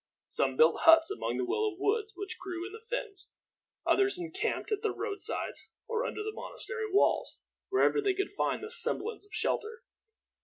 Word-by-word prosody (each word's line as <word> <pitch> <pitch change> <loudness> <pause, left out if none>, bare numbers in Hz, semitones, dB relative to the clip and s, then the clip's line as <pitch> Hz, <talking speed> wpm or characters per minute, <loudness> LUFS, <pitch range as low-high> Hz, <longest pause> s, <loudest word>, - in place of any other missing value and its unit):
Some - - +1
built 475 - +5
huts 325 +2 +7
among 405 - -2
the - - 0
willow 425 +1 0
woods 425 +2 0
which 390 -1 -6
grew 360 -2 -5
in 395 - -8
the 440 - -8
fens; 455 -4 -5 0.5
others 395 -1 +3
encamped 355 +6 -3
at 420 -1 0
the 440 - +1
road 400 0 -4
sides, - - -2 0.2
or 465 +1 -1
under 430 - -4
the 430 0 -4
monastery 470 -3 -5
walls, 400 - +2 0.3
wherever 400 +2 +3
they 395 -2 +1
could 390 +1 -2
find 405 - -1
the 435 - -6
semblance 450 -3 0
of - - -30
shelter. 450 +2 -2
415 Hz, 180 wpm, -31 LUFS, 390-445 Hz, 0.5 s, huts